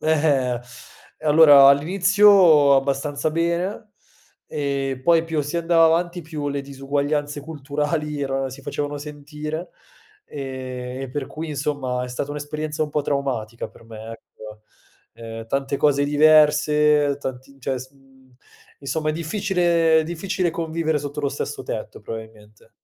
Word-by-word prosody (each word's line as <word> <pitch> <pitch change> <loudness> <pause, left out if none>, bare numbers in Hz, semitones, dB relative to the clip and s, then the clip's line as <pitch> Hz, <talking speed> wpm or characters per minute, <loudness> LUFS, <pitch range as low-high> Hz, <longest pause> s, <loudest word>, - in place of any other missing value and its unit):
Eh-eh. 145 -6 +1 0.6
Eh, 155 - -8
allora 145 -3 +8
all'inizio 180 -1 +5
abbastanza 140 +2 -1
bene 170 +6 -2 0.5
e 140 -2 -3
poi 165 +2 +4
più 160 -2 -1
si 145 +4 -4
andava 165 -1 +4
avanti, 175 +2 0
più 150 -2 -5
le 140 0 -2
disuguaglianze 145 +2 -2
culturali 150 0 -3
erano 135 -1 -2
si 130 +2 -10
facevano 145 +1 -4
sentire, 150 +3 -7 0.6
ehm, 130 -2 -6
e 135 - -5
per 140 0 -4
cui 160 +1 -7
insomma 140 -4 -2
è 125 - -7
stata 130 +3 -4
un'esperienza 150 +1 -4
un 150 - -3
po' 150 -1 -1
traumatica 125 -6 -3
per - - -19
me, 110 0 -9
ecco. 110 -1 -13 0.5
Ehm, 115 0 -8
tante 135 +3 -1
cose 145 -1 +3
diverse, 150 -1 +4
tanti 130 0 -7
cioè, 130 0 -2
s 130 +1 -10
mhmm, 135 -1 -24 0.5
insomma, 155 +3 -2
è - - -2
difficile 170 -1 +2
è - - -1
difficile 175 +2 -2
convivere 160 -1 -1
sotto 145 +1 -5
lo 145 - 0
stesso - - -5
tetto - - -6
probabilmente. 110 -1 -10
145 Hz, 140 wpm, -22 LUFS, 135-160 Hz, 0.6 s, allora